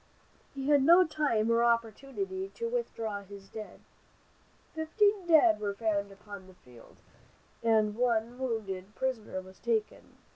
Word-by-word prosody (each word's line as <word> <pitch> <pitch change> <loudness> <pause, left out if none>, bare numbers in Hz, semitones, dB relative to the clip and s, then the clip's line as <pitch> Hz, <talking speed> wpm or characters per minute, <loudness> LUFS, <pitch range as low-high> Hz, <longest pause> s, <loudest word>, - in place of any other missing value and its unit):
He 270 0 -4
had 290 -2 +5
no 345 +6 +7
time 255 -9 0
or 230 0 +3
opportunity 275 - -1
to 465 -1 -3
withdraw 230 - -3
his 200 0 -13
dead. 215 -1 -9 0.9
Fifteen 385 +4 +1
dead 325 -3 +5
were 205 -1 -3
found 200 -2 -1
upon 200 -1 -11
the 185 - -16
field, 125 -7 -18 0.6
and 220 -2 +2
one 235 0 0
wounded 210 -6 -4
prisoner 230 -7 -3
was 185 0 -15
taken. 225 -2 -2
230 Hz, 135 wpm, -30 LUFS, 205-295 Hz, 0.9 s, no